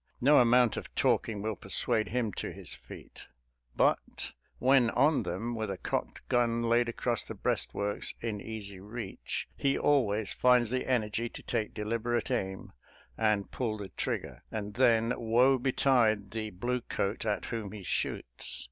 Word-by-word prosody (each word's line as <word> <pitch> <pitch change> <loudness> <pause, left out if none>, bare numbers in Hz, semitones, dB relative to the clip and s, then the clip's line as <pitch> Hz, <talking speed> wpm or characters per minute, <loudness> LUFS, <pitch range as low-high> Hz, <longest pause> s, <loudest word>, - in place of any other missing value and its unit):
No 145 +4 +6
amount 120 -1 +5
of - - -7
talking 105 -3 +1
will 110 -1 -1
persuade 110 +3 0
him 115 -3 -1
to - - -4
his - - -6
feet, - - -12 0.5
but, - - +1 0.3
when 130 -2 +4
on 140 +6 +3
them, 95 +7 -3
with 110 -2 -3
a 95 - -3
cocked - - -3
gun 120 -1 +2
laid 120 +1 +3
across 120 0 -1
the - - -8
breastworks 100 0 -2
in 110 -3 -3
easy 100 -3 -7
reach, 105 +1 -5
he 135 -1 +1
always 110 -8 +2
finds 125 -2 +4
the 130 0 -1
energy 115 -2 0
to - - -10
take 110 -3 -2
deliberate 115 +2 -1
aim 95 0 -3 0.4
and 105 -3 +1
pull 115 -4 -2
the 100 -2 -7
trigger; - - -4
and 105 -1 -4
then, 115 -1 +4
woe 125 +3 +3
betide 120 -6 +2
the 110 -1 -3
bluecoat 115 0 -2
at 105 -2 -1
whom 110 -4 -3
he 105 -2 -8
shoots - - -1
115 Hz, 155 wpm, -30 LUFS, 105-120 Hz, 0.5 s, No